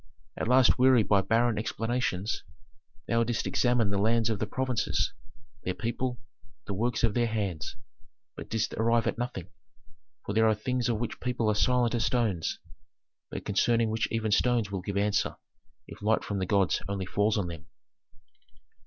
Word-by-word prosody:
At - - -3
last, 125 +1 +5
wearied 130 -4 +5
by 100 -2 +4
barren 115 +1 +2
explanations, 115 -3 -2 0.6
thou 115 0 +2
didst 115 0 -2
examine 120 -5 +2
the 100 - 0
lands 115 +2 +2
of 105 - -2
the 110 - -1
provinces, 130 +1 -1 0.5
their 90 - -2
people, 120 +1 -3 0.5
the 100 - -4
works 120 +5 -1
of 115 -3 +3
their 120 +1 +2
hands, 100 -6 -3 0.6
but - - -9
didst 110 -1 -1
arrive 115 +1 +2
at - - -1
nothing. 95 -7 -4 0.8
For 100 - -3
there 110 +1 +4
are 110 - +3
things 125 +3 -1
of 115 - +1
which 120 +1 -4
people 120 -3 -1
are - - +3
silent 125 +2 +2
as 120 -2 +1
stones, 110 -9 0 0.7
but - - -6
concerning 115 +2 +2
which 110 0 -1
even 110 -2 -1
stones 115 -1 +2
will 95 -2 -3
give 100 +2 -4
answer 105 0 +1 0.5
if - - -12
light 110 +2 +2
from 100 -1 -3
the 95 - -2
gods 100 -2 +2
only 100 -2 -2
falls 105 +3 +1
on 100 - 0
them. 85 -3 -8
110 Hz, 170 wpm, -28 LUFS, 100-120 Hz, 0.8 s, last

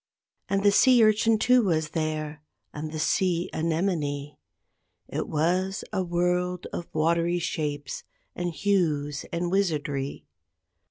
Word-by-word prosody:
And 195 0 +1
the 205 - +6
sea 245 +3 +6
urchin 215 +1 +4
too 250 +3 +4
was 160 -7 0
there, 155 -1 -3 0.3
and 155 +1 -5
the 155 - -5
sea 175 +2 +1
anemone. 155 -4 -1 0.7
It - - -3
was 180 +5 0
a 190 - +1
world 180 +1 0
of 170 - -4
watery 170 +2 +1
shapes 145 -4 -3 0.3
and 175 0 -2
hues 155 -7 0
and 175 +1 -2
wizardry. 150 -8 -1
170 Hz, 120 wpm, -26 LUFS, 155-190 Hz, 0.7 s, the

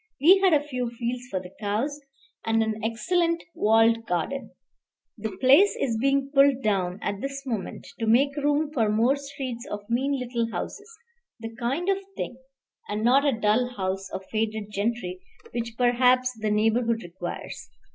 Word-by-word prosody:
We 360 +8 +7
had 385 -1 +4
a 295 -2 +4
few 250 -4 -2
fields 240 +1 -4
for 190 - -2
the 180 0 -11
cows, 225 +8 -2 0.4
and 225 0 +2
an 220 0 -3
excellent 335 +9 0
walled 225 +1 +3
garden. 180 - -2 0.7
The 220 -1 -6
place 280 +11 +6
is 235 -4 0
being 275 +2 +1
pulled 275 -1 +4
down 190 -4 0
at 200 0 -3
this 275 0 -5
moment 225 -7 -4
to 225 - -1
make 275 +5 +4
room 290 +1 +1
for 225 -7 +2
more 230 +6 +3
streets 270 -3 -6
of 205 0 -6
mean 275 +4 +1
little 235 -2 -2
houses, 415 - -6 0.5
the 225 0 -7
kind 260 +9 -2
of 390 0 +2 0.2
thing, 245 - -4 0.5
and 210 +1 -2
not 260 +4 +5
a 265 -6 +1
dull 220 +3 +2
house 190 0 -2
of 190 0 -6
faded 215 -1 -2
gentry, 200 -3 -2 0.3
which 230 -1 -4
perhaps 250 +1 +3
the 215 -1 -2
neighborhood 225 +2 +1
requires. 175 0 -7
235 Hz, 165 wpm, -26 LUFS, 215-275 Hz, 0.7 s, We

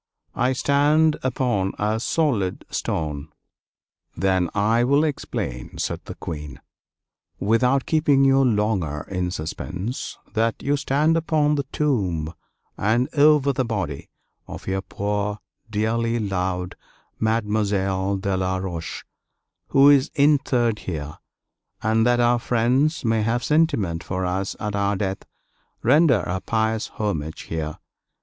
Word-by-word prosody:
I 130 +1 +1
stand 150 +4 +3
upon 120 -7 0
a 105 +2 0
solid 115 - 0
stone." 75 -2 -3 0.9
"Then 95 -1 +1
I 110 +3 +3
will 140 +4 +3
explain," 65 - -4
said - - -3
the - - -7
Queen, 75 -5 -7 0.8
"without 125 +6 +2
keeping 150 -4 +3
you 135 0 +5
longer 105 - 0
in 90 -1 -1
suspense, 90 - -5 0.2
that 115 0 +1
you 145 +1 +2
stand 150 +3 +2
upon 155 -2 +2
the 140 -2 -1
tomb 95 - 0 0.5
and 115 +5 +1
over 145 -1 +5
the 130 - 0
body 95 - -4 0.4
of - - -9
your 95 0 -1
poor 105 +1 -2 0.3
dearly 115 +2 0
loved 90 -3 -2 0.5
Mademoiselle 100 -3 0
de 95 0 -1
La 95 0 0
Roche, 85 -4 -5 0.6
who 135 +1 +5
is 145 0 +5
interred 130 -6 +2
here; 75 -4 -6 0.6
and 110 +1 +3
that 120 0 +3
our 120 0 +3
friends 125 +7 +1
may 115 -1 +2
have 115 +2 0
sentiment 140 - +1
for 95 0 -3
us 95 +2 -2
at 105 -2 -3
our 100 0 +1
death, 95 0 -3 0.6
render 135 - +5
a 90 +2 -3
pious 110 +1 0
homage 80 -7 -3
here. 80 -1 -4
110 Hz, 125 wpm, -23 LUFS, 95-135 Hz, 0.9 s, you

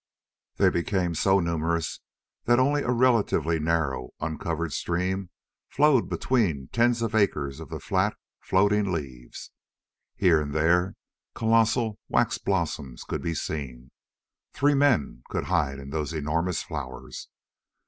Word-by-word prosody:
They - - +4
became 90 0 0
so 95 +4 +3
numerous 85 -2 -1 0.5
that 120 0 +4
only 145 +3 +3
a - - -3
relatively 115 - +2
narrow, 75 -6 -1
uncovered 80 0 -3
stream 90 +2 -2 0.4
flowed 145 -3 +3
between 90 - 0
tens 120 0 +2
of 115 -1 -2
acres 75 -10 +1
of - - -9
the - - -5
flat, - - 0 0.2
floating 100 +1 +2
leaves. 65 -7 -6 0.6
Here 85 -5 +4
and 75 0 -5
there 90 +4 +2 0.4
colossal 115 -1 +2
waxen - - +1
blossoms 80 -9 -2
could - - -4
be 85 -1 -2
seen. 65 -6 -5 0.6
Three 145 +1 +3
men 135 - +2
could - - -2
hide 70 -3 0
in 70 0 -9
those 75 0 -2
enormous 80 +2 -1
flowers. 65 0 -7
85 Hz, 130 wpm, -26 LUFS, 75-110 Hz, 0.6 s, They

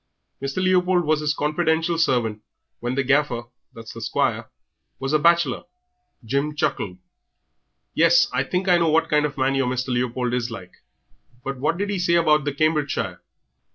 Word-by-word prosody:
Mr. 140 +7 -2
Leopold 180 -1 +2
was 155 0 +2
his 150 -1 -1
confidential 160 +2 0
servant 120 -9 0 0.4
when 120 +2 -3
the 140 - +1
Gaffer 135 -3 +1 0.3
that's 115 -1 -10
the 115 - -9
squire 110 - -1 0.5
was 135 +2 -3
a 155 - +4
bachelor." 170 +2 +2 0.6
Jim 140 +5 -1
chuckled. 95 -10 -2 1.0
"Yes, 240 +11 +5
I - - +1
think 185 +1 -2
I 175 -1 +5
know 165 -1 +2
what 160 +1 +2
kind 150 0 +3
of 140 -1 -11
man 135 +1 +1
your 135 -2 +1
Mr. 130 +1 -2
Leopold 125 0 -1
is 125 -1 -1
like. 95 -6 -9 0.7
But 135 -1 -5
what 150 +5 0
did 205 +2 -2
'e 195 - -2
say 170 -1 +2
about 155 -3 +3
the 145 - 0
Cambridgeshire?" 150 0 -1
150 Hz, 170 wpm, -23 LUFS, 125-165 Hz, 1.0 s, Yes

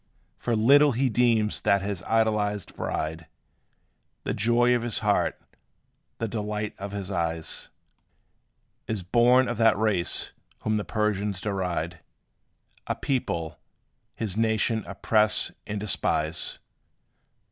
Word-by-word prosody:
For 120 - 0
little 140 +6 +5
he 130 +3 +1
deems 115 -2 +2
that 100 -1 +2
his 100 -3 -3
idolized 105 -3 0
bride, 80 +1 -3 1.0
The - - -2
joy 120 +3 +3
of 120 - +1
his 120 -2 -1
heart - - +1 0.8
the 115 - -2
delight 105 0 -3
of 100 0 -5
his 100 -1 -5
eyes, 85 -3 -3 1.2
Is 110 -4 -2
born 120 +6 +4
of 120 - -3
that 115 -2 +4
race 100 -5 +1 0.3
whom 110 0 0
the 105 - -2
Persians 105 -3 -1
deride 90 -4 -2 0.9
A - - -1
people, 85 - -2 0.6
his 105 -5 -3
nation 110 0 +1
oppress 105 +2 +2 0.2
and 105 -1 -3
despise. 80 -6 0
105 Hz, 115 wpm, -26 LUFS, 95-115 Hz, 1.2 s, little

